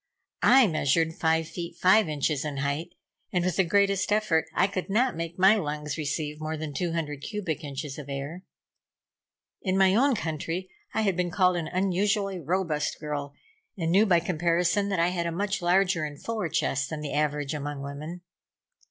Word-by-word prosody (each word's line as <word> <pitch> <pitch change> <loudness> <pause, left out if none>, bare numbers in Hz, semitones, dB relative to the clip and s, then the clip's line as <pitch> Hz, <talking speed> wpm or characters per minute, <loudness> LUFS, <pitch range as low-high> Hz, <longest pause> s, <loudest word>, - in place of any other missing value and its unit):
I 260 +1 +7
measured 160 -2 +1
five 160 -1 +1
feet 170 0 -6
and - - -23
five 190 0 +5
inches 145 -1 0
in 150 -2 -4
height, 140 +5 -2 0.4
and 180 -1 +1
with 185 -2 0
the 190 - +5
greatest 200 +2 +2
effort 205 -7 +2
I 180 - +4
could 195 -1 -3
not 240 +6 +2
make 170 +1 -5
my 190 +4 +6
lungs 150 -4 -3
receive 150 0 -3
more 155 0 -3
than 155 -1 -5
two 170 +4 -2
hundred 150 -4 -3
cubic 180 -7 -4
inches 140 0 -5
of 145 -1 -9
air. 140 +6 -5 1.2
In 190 -1 0
my 190 -1 +5
own 265 +5 +4
country 165 +1 -4 0.2
I 220 - 0
had 195 -4 +1
been 180 0 0
called 185 0 +3
an 170 -2 -2
unusually 195 +2 0
robust 165 -2 -1
girl, 145 -2 -4 0.4
and 165 -2 -1
knew, 205 +5 +5
by 175 -3 +4
comparison, 175 +4 +1
that 195 -3 0
I 170 +1 +3
had 175 -2 -2
a - - -2
much 200 +3 -2
larger 180 -1 +2
and 145 -1 -5
fuller 220 -7 -3
chest 135 -1 0
than 155 -1 -5
the 150 - -4
average 150 -1 0
among 145 -1 -4
women. 150 +5 -7
170 Hz, 185 wpm, -27 LUFS, 150-190 Hz, 1.2 s, I